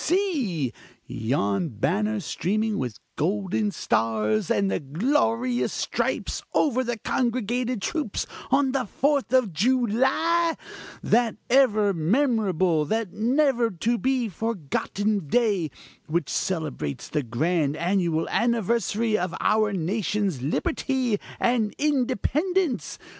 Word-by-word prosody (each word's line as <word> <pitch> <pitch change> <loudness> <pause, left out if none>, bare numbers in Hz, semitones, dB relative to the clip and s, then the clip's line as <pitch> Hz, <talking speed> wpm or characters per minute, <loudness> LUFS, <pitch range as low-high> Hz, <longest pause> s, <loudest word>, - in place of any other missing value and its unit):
See! 270 - 0 0.3
yon 110 - -1
banner 205 - 0
streaming 215 +5 -1
with 125 -4 -3 0.2
golden 200 +5 0
stars 110 - 0
and 170 -8 0
glorious 245 - +1
stripes - - -2
over 260 -4 +2 0.2
congregated 245 -1 -1
troops, 300 -11 -2 0.2
on 275 -1 +3
the 260 -2 0
Fourth 280 +4 0
of 255 -8 +3
July, 260 - +2 0.5
that 235 -1 +2 0.2
ever 215 -6 +4
memorable 185 - +2
that 220 +2 -2
never 245 +1 +2
to 225 +6 -1
be 260 -2 +1
forgotten 205 -1 -2
day, 200 -4 +1 0.4
which 160 -1 -1
celebrates 155 - -3
the 150 - -1
grand 145 +5 0
annual 170 -2 0
anniversary 230 -1 +1
of 180 -3 -1
our 215 -1 +2
nation's 195 - -1
liberty 255 - 0 0.2
and 235 -4 +1
independence! 300 - 0
215 Hz, 100 wpm, -25 LUFS, 170-250 Hz, 0.5 s, ever